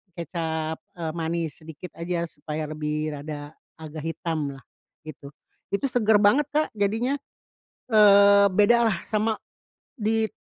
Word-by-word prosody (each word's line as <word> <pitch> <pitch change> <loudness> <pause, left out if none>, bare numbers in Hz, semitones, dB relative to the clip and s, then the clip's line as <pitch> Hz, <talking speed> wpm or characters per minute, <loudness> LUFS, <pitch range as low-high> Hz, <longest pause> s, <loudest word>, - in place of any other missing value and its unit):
kecap, 160 -2 -3 0.2
eee, 165 -2 -3
manis 165 -1 -2
sedikit 160 +3 -10
aja 170 0 -2
supaya 150 +1 -5
lebih 155 0 -3
rada 145 +1 -7 0.2
agak 155 -1 -8
hitam 155 -4 -3
lah 135 - -15 0.4
gitu. 140 -2 -10 0.4
Itu 275 +7 +1
seger 220 -4 +3
banget 260 +8 +4
Kak, 305 +1 +2
jadinya. 225 +7 0 0.7
Eee, 200 -1 +7
bedalah 225 0 +4
sama 215 0 +1 0.6
di 220 0 +1
170 Hz, 120 wpm, -25 LUFS, 155-210 Hz, 0.7 s, Eee